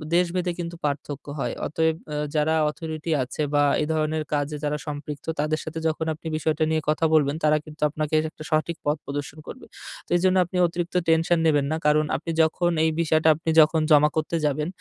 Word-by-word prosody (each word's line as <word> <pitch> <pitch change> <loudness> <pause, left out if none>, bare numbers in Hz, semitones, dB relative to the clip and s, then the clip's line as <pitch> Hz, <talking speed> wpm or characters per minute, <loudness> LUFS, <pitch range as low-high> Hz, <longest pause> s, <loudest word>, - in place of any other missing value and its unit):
দেশভেদে 180 0 +1
কিন্তু 170 0 -4
পার্থক্য 145 -1 -4
হয়। - - -2
অতএব 160 +1 +1 0.2
আ - - -2 0.2
যারা 155 +1 +2 0.2
authority 160 +1 -5
আছে 130 +4 -5
বা 145 0 +4 0.2
এ - - -1
ধরনের 155 0 0
কাজে 145 +1 -1
যারা 150 0 -1
সম্পৃক্ত। 145 0 -6
তাদের 155 +1 0
সাথে 160 +1 -5
যখন 160 0 -1
আপনি 160 +1 -10
বিষয়টা 155 0 0
নিয়ে 160 0 +1
কথা 155 +2 +1
বলবেন, 145 -2 +3
তারা 155 0 +4
কিন্তু 155 0 -13
আপনাকে 155 +1 -4
এর 155 - -1
একটা 155 - -12
সঠিক 155 +2 0
পথ 150 +1 +1
প্রদর্শন 145 +1 -5
করবে। - - -9 0.4
তো - - -27
এজন্য 185 +1 +2
আপনি 180 +2 -5
অতিরিক্ত 175 +1 -5
টেনশন 165 +1 +3
নেবেন 145 -3 +3
না। 160 - 0
কারণ 150 +1 +4
আপনি 165 +5 -4
যখন 175 +2 +1
এই 160 - +3
বিষয়টা 160 -1 +2
আপনি 160 +1 -4
যখন 155 +1 +3
জমা 150 0 +6
করতে 155 +1 -1
যাবেন 150 +1 0
155 Hz, 200 wpm, -24 LUFS, 150-160 Hz, 0.4 s, জমা